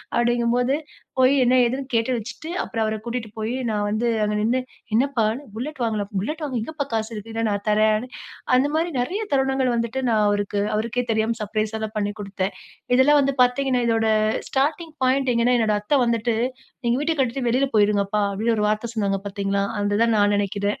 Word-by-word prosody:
அப்படிங்கும்போது 240 +2 +2 0.4
போய் 260 +1 +5
என்ன? 250 +1 +3
ஏதுன்னு 260 +3 -2
கேட்டு 230 +2 +1
வச்சுட்டு, 235 +8 -7
அப்புறம் 225 - -2
அவர 215 0 -1
கூட்டிட்டு 235 -1 -4
போயி, 220 +2 -2 0.2
நான் 210 -1 0
வந்து 215 +3 0 0.2
அங்க 210 0 0
நின்னு, 230 +4 +1 0.3
என்னப்பா! 245 0 +2 0.3
புல்லட் 270 +6 -5
வாங்கலாம். 215 -3 -1
புல்லட் 300 - -2
வாங்க 270 -4 -2
எங்கப்பா 295 +3 -4
காசு 220 0 -1
இருக்கு? 220 +1 -7
இல்ல, 225 - -2
நான் 200 0 -2
தர்றேன். 215 +2 +3 0.5
அந்த 260 +3 +3
மாரி 330 +2 +1
நெறைய 360 - -1
தருணங்கள் 265 -1 +2
வந்துட்டு, 235 +3 -1
நான் 215 -2 +3
அவருக்கு 205 0 0
அவருக்கே 235 +3 -1
தெரியாம 220 +1 0
சர்ப்ரைஸா 215 +1 -2
தான் 215 - -9
பண்ணி 205 -1 0
கொடுத்தேன். 195 -1 -3 0.4
இதெல்லாம் 290 +3 +5
வந்து 275 0 0
பாத்தீங்கன்னா, 250 0 +1
இதோட 225 -1 +2 0.4
ஸ்டார்ட்டிங் 305 +4 -1
பாயிண்ட் 260 0 +2
எங்கனா, 240 +2 +3
என்னோட 215 -2 +2
அத்த 270 +6 +2
வந்துட்டு, 230 -1 0 0.5
"நீங்க 235 +1 +2
வீட்ட 320 +2 0
கட்டிட்டு 255 0 0
வெளில 260 +3 +2
போய்டுங்கப்பா" 205 0 +2
அப்டின்னு, 225 +4 0
ஒரு 210 - +1
வார்த்த 215 +2 -2
சொன்னாங்க 200 -2 0
பாத்தீங்களா? 200 0 -1 0.2
அது 205 +1 +1
தான் 230 -1 +2
நான் 205 0 +3
நினைக்கிறேன். 200 0 -1
230 Hz, 180 wpm, -23 LUFS, 210-255 Hz, 0.5 s, போய்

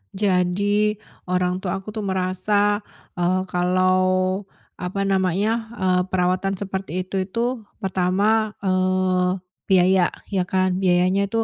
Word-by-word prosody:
Jadi, 200 +2 +1 0.3
orang 180 0 0
tua 185 -2 -2
aku 215 - -7
tuh 215 0 -5
merasa, 195 +2 +1 0.4
eee, 180 +2 +2
kalau 185 +1 +2 0.3
apa 180 +2 -3
namanya, 195 +4 +1
eee, 185 -3 +2
perawatan 185 +1 0
seperti 190 -2 -4
itu 190 +1 -3
itu 235 +2 -2 0.2
pertama, 200 +4 +1
eee, 185 -1 +1 0.3
biaya, 185 -1 +4 0.2
ya 185 -2 0
kan. 185 0 +1
Biayanya 185 +1 +2
itu 225 +2 0
185 Hz, 115 wpm, -22 LUFS, 185-200 Hz, 0.4 s, biaya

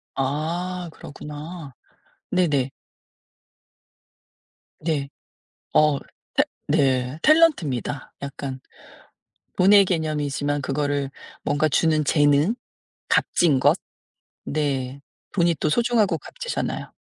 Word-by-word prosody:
아. 170 +6 -2
그렇구나. 150 0 -9 0.6
네네. 150 -8 +2 2.1
네. 150 -4 -1 0.6
어. 150 -2 +4
탤 - - -2 0.3
네 130 0 +2
탤런트입니다. 170 - +3
약간 135 -1 -5 1.0
돈의 200 +2 +7
개념이지만 145 -4 -1
그거를 140 0 -1 0.3
뭔가 145 +2 +2
주는 155 0 +2
재능 145 +7 +3 0.5
값진 155 -6 +3
것 - - +5 0.7
네. 140 -3 -2 0.3
돈이 170 -3 +3
또 - - +2
소중하고 220 -2 +2
값지잖아요. 485 - -4
150 Hz, 180 characters per minute, -24 LUFS, 140-175 Hz, 2.1 s, 돈의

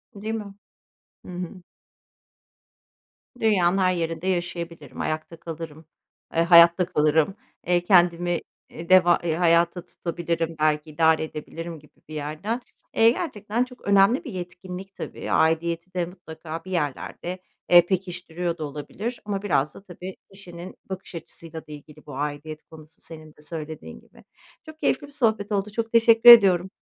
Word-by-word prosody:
Değil 215 +2 -4
mi? 210 -3 -5 0.7
Hı - - -9
hı. 180 +1 -6 1.8
Dünyanın 195 -5 +3
her 185 -1 +3
yerinde 165 0 -3
yaşayabilirim, 170 -5 -4
ayakta 155 +1 -4
kalırım, 160 -1 -8 0.5
ııı, 165 - +4
hayatta 170 +1 +7
kalırım, 155 +5 +2 0.3
ııı, 175 -1 +3
kendimi, 175 -1 +3 0.3
eee, 170 +1 -10
deva 180 -2 +6
eee, 160 -2 0
hayata 170 +1 +2
tutabilirim 170 -1 -3
belki 155 0 +1
idare 160 +1 +3
edebilirim 165 +2 -7
gibi 150 - -22 0.2
bir - - -9
yerden. 155 +11 -3 0.3
Eee, 225 0 +6
gerçekten 235 - -2
çok 250 0 -12
önemli 200 - +4
bir 260 - -7
yetkinlik 180 +2 -8
tabii, - - -6
aidiyeti 170 +2 +1
de 180 -1 0
mutlaka 165 -2 -9
bir 185 - -8
yerlerde, 175 +2 -3 0.3
eee, 175 -1 +8
pekiştiriyor 180 -2 -3
da 160 - -5
olabilir 150 - -6
ama 200 -2 -2
biraz 150 -7 0
da - - -12
tabii, 185 0 -9 0.2
kişinin 180 -2 -10
bakış 190 -1 -7
açısıyla 165 0 -9
da - - -12
ilgili 150 +1 -12
bu 145 - -9
aidiyet 150 +2 -5
konusu 155 -1 -16
senin 155 -1 -8
de 150 - -20
söylediğin 155 0 -7
gibi. - - -21 0.4
Çok 315 0 -12
keyifli 285 - 0
bir 285 - -17
sohbet 220 -6 0
oldu, 205 0 -1
çok 225 +1 -3
teşekkür 230 0 +7
ediyorum. 190 -6 +8
175 Hz, 150 wpm, -24 LUFS, 160-195 Hz, 1.8 s, eee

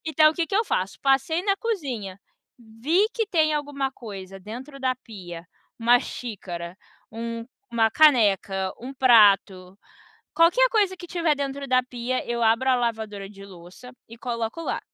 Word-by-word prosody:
Então 310 -1 +5
o - - -8
que 335 0 -1
eu 440 +3 +3
faço? 190 - -2
Passei 275 +5 +1
na 395 0 +1
cozinha, 265 - -4 0.4
vi 245 - 0
que 450 -2 -1
tem 315 -5 +2
alguma 285 -2 -2
coisa 195 -6 -9
dentro 250 +9 -9
da 260 -1 +1
pia: 185 -9 -10 0.3
uma 240 +1 +5
xícara, 185 -9 -7 0.4
um 230 0 -5 0.3
uma 225 -1 +2
caneca, 205 -9 +3
um 260 +3 -8
prato, 200 -7 +4 0.6
qualquer 355 +10 +5
coisa 410 -5 +1
que 350 -1 -11
tiver 335 -3 +1
dentro 280 0 -4
da 255 0 +3
pia, 250 0 -3
eu 235 0 -1
abro 230 +4 +3
a 255 - +5
lavadora 220 -4 -3
de 195 -1 -13
louça 185 +6 -13 0.2
e 230 - -12
coloco 235 +4 -4
lá. - - -2
245 Hz, 155 wpm, -24 LUFS, 210-300 Hz, 0.6 s, Então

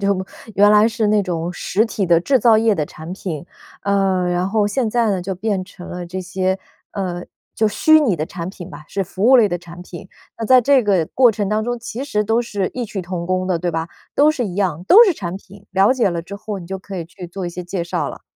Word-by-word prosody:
就 200 -1 0 0.3
原 205 +1 +5
来 210 +1 +6
是 225 -2 -1
那 210 0 +3
种 175 -1 -3
实 205 +4 0
体 205 -4 -2
的 170 -1 +4
制 265 +9 +2
造 230 -3 +5
业 220 0 +3
的 150 -4 -2
产 160 +3 -9
品。 170 -6 -5 0.4
呃， 195 -2 +1
然 175 +2 0
后 210 0 +1
现 225 +3 0
在 230 -1 +1
呢 190 - 0
就 190 +1 -4
变 195 0 -2
成 185 -1 -12
了 180 -1 -6
这 185 +2 -5
些， 185 +1 -1 0.4
呃， 180 -3 -4 0.3
就 220 - +3
虚 315 +9 +5
拟 260 -11 +2
的 155 -2 -2
产 170 0 -6
品 185 -1 -9
吧， 150 +1 -11
是 195 - -2
服 195 +5 -1
务 265 - +8
类 220 -4 +5
的 175 - -2
产 175 0 -11
品。 180 +1 -10 0.3
那 225 - -3
在 255 +1 +7
这 265 -1 +3
个 190 -5 +2
过 250 -3 +4
程 205 -2 -2
当 215 +1 0
中， 245 +1 -2
其 240 +3 -5
实 210 -7 0
都 225 +3 +1
是 205 -5 -2
异 250 -1 -3
曲 200 -3 -5
同 175 -1 -5
工 185 0 0
的， 180 - +1
对 175 0 -2
吧？ 165 +1 -2 0.3
都 295 +2 +5
是 265 -6 -2
一 180 - -6
样， 180 -4 -1
都 435 - +8
是 385 - +3
产 185 - -5
品， 200 +1 -15
了 195 +5 +4
解 250 -6 +2
了 170 -2 -3
之 200 +3 -8
后 210 -2 -6
你 170 - -10
就 190 +1 -5
可 195 0 -8
以 170 - -4
去 175 +2 -10
做 185 +2 -6
一 175 - -2
些 180 +1 -7
介 175 0 -3
绍 170 - -2
了。 - - -9
195 Hz, 280 characters per minute, -19 LUFS, 180-220 Hz, 0.4 s, 务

